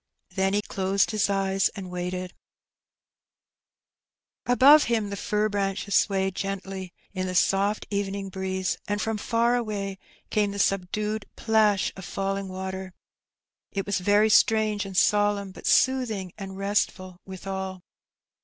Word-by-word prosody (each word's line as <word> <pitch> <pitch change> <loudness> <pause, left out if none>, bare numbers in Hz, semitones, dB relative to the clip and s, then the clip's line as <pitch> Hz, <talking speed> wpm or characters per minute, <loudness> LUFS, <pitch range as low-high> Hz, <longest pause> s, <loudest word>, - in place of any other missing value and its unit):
'' - - -48
Then 195 0 +1
he 205 - +1
closed 195 +1 0
his 210 -2 +1
eyes 195 -1 +1
and 190 -3 -7
waited* 180 0 -4 2.1
Above 275 +5 +7
him 220 -3 0
the - - -3
fir 210 +2 0
branches 200 -1 -2
swayed 190 -2 +2
gently 195 -1 -5 0.2
in 185 -1 -2
the 185 - -4
soft 195 +4 +2
evening 200 -1 -2
breeze, 190 0 -2
and 205 0 -1
from 220 0 -2
far 235 +3 +2
away 200 -5 -3 0.3
came 210 -2 +2
the - - -6
subdued 200 +2 -1
plash 215 -3 +2
of 190 - -9
falling 195 +1 -3
water. 190 0 -6 0.8
It 195 -1 -2
was 200 -1 0
very 205 +3 +3
strange 215 -1 +3
and 190 -2 -6
solemn, 205 -1 +2
but - - -8
soothing 225 -9 +2
and 195 -2 -8
restful 195 -2 -1
withal. 190 -1 -5
195 Hz, 135 wpm, -26 LUFS, 190-210 Hz, 2.1 s, Above